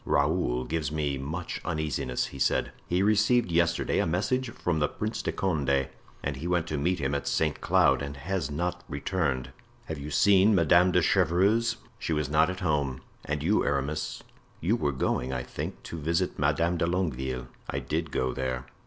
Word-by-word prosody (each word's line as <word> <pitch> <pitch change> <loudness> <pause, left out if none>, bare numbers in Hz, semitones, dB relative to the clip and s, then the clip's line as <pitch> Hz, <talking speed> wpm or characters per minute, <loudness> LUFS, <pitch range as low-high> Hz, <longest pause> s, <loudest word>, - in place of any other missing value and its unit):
"Raoul 70 -4 +1
gives 80 -3 -2
me 75 -3 -1
much 80 +6 -4
uneasiness," 75 -6 -1
he 70 - -8
said. - - +1 0.2
"He 90 +2 +1
received 105 0 +3
yesterday 85 0 +2
a - - +2
message 105 +9 0
from 90 -9 -1
the 75 - +2
Prince 110 +8 -3
de - - -1
Condé; 70 -7 0 0.4
he 70 +6 -5
went 90 -2 +1
to 75 - -1
meet 90 +5 +1
him 70 -2 -1
at 70 - -2
Saint 75 -3 0
Cloud 70 +1 +4
and 70 0 -5
has 90 +4 -2
not 90 +4 -2
returned." 70 -3 -1 0.3
"Have 80 -2 -5
you 70 +2 -6
seen 100 +7 +5
Madame 85 +1 +5
de 90 -1 +3
Chevreuse?" 100 +10 +3 0.2
"She 80 - -1
was 75 -2 -1
not 80 +3 +4
at 90 0 -5
home. 70 -6 0 0.2
And 75 0 -2
you, 100 +7 +3
Aramis, 70 +2 -2 0.4
you 95 +8 +2
were 75 -11 0
going, 65 -1 -1
I 65 -1 -2
think, 65 - -6
to 85 - -6
visit 80 +3 -1
Madame 85 +1 +2
de 85 - +1
Longueville." 65 -8 -2 0.2
"I - - -2
did 80 +1 -2
go 65 -2 -1
there." 65 -1 -3
80 Hz, 180 wpm, -28 LUFS, 70-90 Hz, 0.4 s, seen